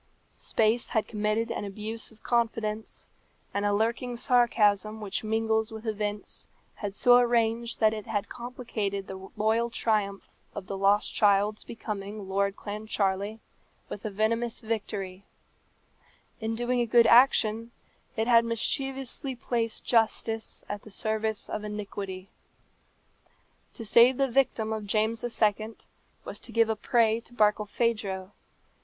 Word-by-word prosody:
Space 225 +2 +1
had 220 - 0
committed 215 +2 -1
an - - -3
abuse 215 +3 -4
of 220 - -22
confidence, 225 -2 -1 0.5
and 205 0 0
a - - +2
lurking 235 +4 0
sarcasm 220 -4 +3
which 205 -1 -3
mingles 220 0 0
with 220 +1 -8
events 210 -1 -3 0.3
had 205 -2 -6
so 245 +2 +6
arranged 235 -1 +1
that 220 -1 +4
it 215 -1 -6
had 205 -2 -2
complicated 225 -5 -4
the 190 0 -9
loyal 220 +2 +1
triumph 210 -4 -1 0.3
of 205 - -5
the 195 - -5
lost 200 +2 +2
child's 205 +1 +3
becoming 210 -2 -6
Lord 200 +1 0
Clancharlie 205 0 -2 0.5
with 205 - -7
a 215 - -2
venomous 225 +3 0
victory: 200 -4 -4 1.2
in 225 0 -2
doing 240 +1 0
a 240 - +1
good 235 0 +6
action, 230 -2 +5 0.5
it 220 +1 0
had 235 -1 +6
mischievously 265 +3 -1
placed 230 -2 -2
justice 225 -1 0
at 205 0 -5
the - - -13
service 220 +1 -1
of 210 - -4
iniquity. 200 -2 -6 1.4
To 230 - -5
save 240 +4 +6
the 275 - +2
victim 235 -4 +1
of 215 -2 -5
James 220 +2 0
II. 220 -2 0 0.5
was - - -6
to - - -6
give 230 -1 +3
a 220 - +1
prey 225 0 +2
to 240 +1 -15
Barkilphedro. 210 -2 0
220 Hz, 135 wpm, -28 LUFS, 205-230 Hz, 1.4 s, so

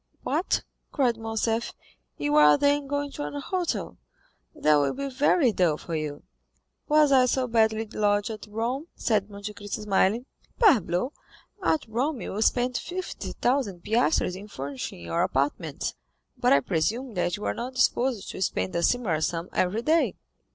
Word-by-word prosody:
"What," 315 +7 0 0.3
cried 255 -5 +2
Morcerf; 225 +1 -1 0.4
"you 145 0 -1
are, 150 -1 +7
then, 285 0 +2
going 285 0 -2
to 290 - -5
a 290 - -5
hotel—that 350 - -2
will 140 -1 +1
be 275 +1 -3
very 275 0 +3
dull 175 -7 +2
for 165 - -5
you." 150 -2 -4 0.6
"Was 300 -1 +5
I 255 -2 +6
so 255 +1 +1
badly 225 -2 +2
lodged 205 0 0
at 215 -1 -8
Rome?" 235 +8 -3
said 210 -3 0
Monte 200 +1 -7
Cristo 205 +1 -6
smiling. 210 +3 +2 0.3
"Parbleu! 250 - +3 0.5
at 320 -4 +1
Rome 255 +5 -1
you 205 - -4
spent 245 +2 +2
fifty 365 +1 -5
thousand 240 -9 0
piastres 225 - +2
in 200 +2 -9
furnishing 135 - -6
your 125 - -1
apartments, 150 -2 -1 0.4
but - - +2
I 140 - +6
presume 220 - -1
that 180 0 -1
you 210 - -6
are - - 0
not 250 +2 -5
disposed 255 -3 +1
to - - -7
spend 95 - -1
a 170 - +1
similar 180 -6 +1
sum 170 +2 -2
every 200 +6 0
day." 320 +4 +2
220 Hz, 160 wpm, -26 LUFS, 180-265 Hz, 0.6 s, are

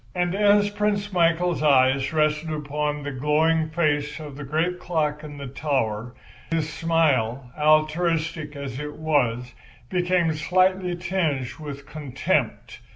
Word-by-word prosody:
And 175 0 0
as 205 0 +4
Prince 205 -1 -1
Michael's 170 -1 +2
eye 130 -3 +5 0.2
rested 155 0 +1
upon 150 -1 -2
the 145 - -4
glowing 155 +4 +1
face 150 -2 0
of 150 -3 -8
the 145 - -7
great 160 +6 -1
clock 150 -4 -1
in 145 -1 -9
the 140 - -6
tower, 125 -4 -2 0.3
his 165 -2 0
smile, 135 -7 +1
altruistic 155 0 +1
as 140 -2 -6
it 150 0 -6
was, 125 -6 0 0.4
became 180 -2 +1
slightly 185 +3 +1
tinged 170 -8 -1
with 140 -2 -7
contempt. 140 -3 -2
155 Hz, 130 wpm, -24 LUFS, 145-170 Hz, 0.4 s, eye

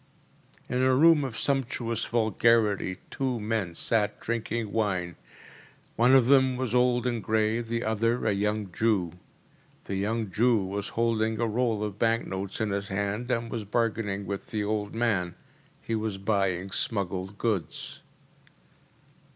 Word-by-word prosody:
‚ÄĚ 125 - -2
In - - +1
a 130 0 +4
room 160 +1 +6
of 125 -4 -4
sumptuous 125 -3 0
vulgarity 110 -4 +2
two 130 -3 -1
men 105 -5 -2
sat 105 +3 0
drinking 115 -1 -3
wine. 95 -6 -1 0.8
One 125 +3 +5
of 130 -3 +6
them 130 -1 +4
was 125 -3 -2
old 125 0 +3
and 120 -4 -1
grey, 110 +1 +1
the 115 0 -3
other 115 +2 0
a 110 - +3
young 105 0 -1
Jew. 100 -4 +1 0.7
The 95 - -4
young 110 +1 -1
Jew 120 +6 +3
was 100 +1 -3
holding 110 -1 +1
a 120 - +2
roll 115 -1 0
of 105 -1 -5
bank 115 0 +2
notes 95 0 -5
in 110 -2 0
his 100 0 -2
hand, 100 +5 -2
and 115 -2 -1
was 115 - -3
bargaining 105 -2 -1
with 100 -1 -5
the 105 -2 -2
old 105 0 -2
man. 100 -7 0 0.5
He 115 - -3
was 110 -2 -2
buying 95 -2 0
smuggled 95 -2 -2
goods. 105 -7 -3
110 Hz, 150 wpm, -27 LUFS, 100-115 Hz, 0.8 s, room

